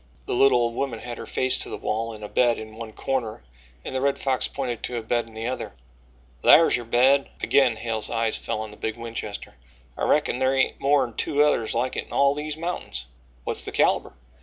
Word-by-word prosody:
The - - -3
little 125 0 +5
old 115 0 0
woman 130 -1 -2
had 120 -1 -7
her - - -7
face 130 0 0
to - - -3
the - - -5
wall 115 +2 -2
in 105 -1 -10
a - - -4
bed 120 +2 +2
in 110 0 -9
one 115 -1 -7
corner 115 - -3 0.4
and - - -5
the 130 - -1
Red 140 0 +1
Fox 135 -2 0
pointed 125 -4 -4
to 125 - -3
a 115 - -4
bed 120 +1 0
in 110 - -15
the 110 +1 -4
other: 130 +2 -4 0.7
"Thar's 165 - +7
yo' 120 - -4
bed." 130 +4 +4
Again 130 -5 +4
Hale's 110 -1 -2
eyes 115 -1 +1
fell 110 - -3
on 110 -1 -6
the 105 - -13
big 110 0 -3
Winchester. 115 -3 -6 0.4
"I - - -2
reckon 150 -4 +2
thar 130 +1 +2
hain't 130 - +1
more'n 140 -4 +2
two 145 +6 +2
others 120 -8 +1
like 125 +2 0
it - - -4
in - - -11
all 140 0 +4
these 150 +1 -4
mountains." 165 - -4 0.4
"What's - - -2
the - - -5
calibre?" - - +2
120 Hz, 225 wpm, -25 LUFS, 115-135 Hz, 0.7 s, Thar's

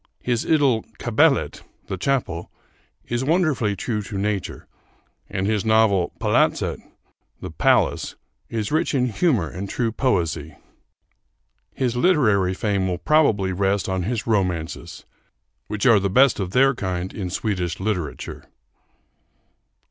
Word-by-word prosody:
His 120 -2 -1
idyl 140 -8 +3
'Kapellet' - - +2 0.2
(The - - -4
Chapel) 95 -5 -2 0.6
is 120 +1 -2
wonderfully 150 - +1
true 105 +2 -2
to 100 0 -6
nature, 100 -1 -3 0.6
and 95 - -2
his 105 -1 0
novel 110 -5 +3
'Palatset' - - +1 0.6
(The - - -7
Palace) - - +1 0.3
is 110 0 -3
rich 155 -1 +1
in 125 -2 +2
humor 115 - +1
and 95 +5 -6
true 115 +1 -1
poesy. 85 - -1 1.2
His 125 -2 -1
literary 110 - +3
fame 100 -2 0
will 90 -1 -1
probably 110 - +2
rest 100 +1 0
on 95 -1 -1
his 110 +4 -2
romances, 90 -7 -2 0.6
which 105 +4 -3
are 115 -5 +6
the 100 0 -1
best 130 +6 +4
of 95 -3 -2
their 135 +7 +4
kind 95 -5 -4
in 95 -4 -4
Swedish 90 -3 -2
literature. 95 -7 -4
105 Hz, 125 wpm, -22 LUFS, 95-125 Hz, 1.2 s, are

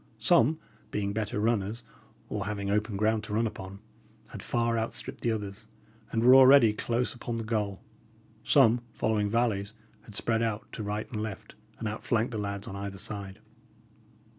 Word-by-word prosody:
Some, 145 +8 +4 0.3
being 100 -1 -2
better 105 -1 -2
runners, 110 +1 0 0.4
or 105 -1 -3
having 100 -1 -2
open 105 0 0
ground 110 +1 +1
to 105 - -4
run 115 +2 +2
upon, 95 -3 -6 0.5
had - - -8
far 115 -1 0
outstripped 115 0 -3
the 115 - +1
others, 105 0 -5 0.4
and 115 - 0
were 125 +2 +8
already 130 -4 +8
close 120 +3 -1
upon 120 -1 -5
the 115 - -3
goal; 105 -3 -2 0.6
some, 120 -4 +5
following 105 -2 0
valleys, 110 -2 0 0.3
had 105 - -12
spread 115 +1 +1
out 110 -2 -1
to - - -6
right 105 +1 -3
and 110 -3 -3
left, 110 -3 -6 0.2
and 110 - -4
outflanked 110 +2 -1
the 110 - -3
lads 100 0 -4
on 95 - -6
either 100 0 -5
side. 100 0 -7
110 Hz, 165 wpm, -29 LUFS, 100-115 Hz, 0.6 s, were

